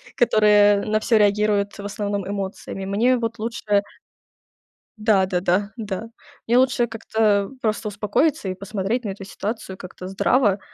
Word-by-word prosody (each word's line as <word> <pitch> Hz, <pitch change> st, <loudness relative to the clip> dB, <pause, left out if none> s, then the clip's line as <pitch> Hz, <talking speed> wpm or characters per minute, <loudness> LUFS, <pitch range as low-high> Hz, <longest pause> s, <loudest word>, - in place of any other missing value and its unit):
которые 210 Hz, -3 st, +4 dB
на 215 Hz, 0 st, +1 dB
всё 225 Hz, +1 st, +2 dB
реагируют 205 Hz, 0 st, +2 dB
в 200 Hz, -, -7 dB
основном 200 Hz, -1 st, -3 dB
эмоциями. 195 Hz, -1 st, -5 dB
Мне 235 Hz, +6 st, +2 dB
вот 230 Hz, -1 st, -3 dB
лучше 215 Hz, -3 st, 0 dB, 1.1 s
Да-да-да, 190 Hz, -2 st, +1 dB
да. 215 Hz, +1 st, -5 dB, 0.4 s
Мне 240 Hz, +2 st, +4 dB
лучше 250 Hz, -2 st, +3 dB
как-то, 225 Hz, 0 st, -4 dB, 0.3 s
э, -, -, -18 dB
просто 215 Hz, 0 st, -1 dB
успокоиться 210 Hz, +5 st, 0 dB
и -, -, -2 dB
посмотреть 200 Hz, +4 st, -3 dB
на -, -, -2 dB
эту 195 Hz, 0 st, -7 dB
ситуацию 205 Hz, -1 st, -5 dB
как-то 180 Hz, 0 st, -9 dB
здраво, 200 Hz, +1 st, +2 dB
210 Hz, 140 wpm, -22 LUFS, 200-225 Hz, 1.1 s, которые